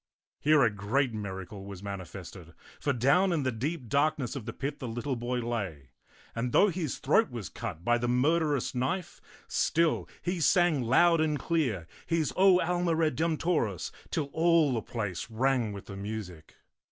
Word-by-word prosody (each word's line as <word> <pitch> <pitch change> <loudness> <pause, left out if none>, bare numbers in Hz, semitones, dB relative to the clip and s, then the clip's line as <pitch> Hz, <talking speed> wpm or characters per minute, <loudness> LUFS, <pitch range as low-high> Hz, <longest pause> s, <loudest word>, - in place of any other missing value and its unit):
Here 150 -1 +5
a 115 - +3
great 115 +6 0
miracle 95 -2 -6
was 100 -1 -9
manifested, 95 -3 -8 0.2
for 145 - 0
down 140 +10 +3
in 160 -4 0
the 130 - +1
deep 130 +4 -3
darkness 145 +1 +1
of 120 -5 -6
the - - -2
pit 140 +5 -4
the 130 - -5
little 120 +4 -3
boy 120 +1 -2
lay; 95 - -4 0.4
and 120 +1 -2
though 205 - +6
his 165 -6 -3
throat 155 +10 +3
was 120 -6 -6
cut 85 +3 -6
by 120 0 +3
the 120 - -1
murderous 145 +3 +1
knife, 165 +8 -2 0.3
still 165 0 +1
he 180 0 -1
sang 175 -3 +3
loud 160 +8 +4
and 155 -1 +1
clear 130 - -1 0.2
his 165 -3 0
O 190 -1 +6
Alma 175 -1 +1
Redemptoris 160 - 0 0.2
till 145 -3 -2
all 165 -4 +4
the 115 - -1
place 105 -4 -4
rang 120 -1 +1
with 100 -1 -8
the 100 - -8
music. 100 -5 -7
130 Hz, 165 wpm, -29 LUFS, 105-160 Hz, 0.4 s, though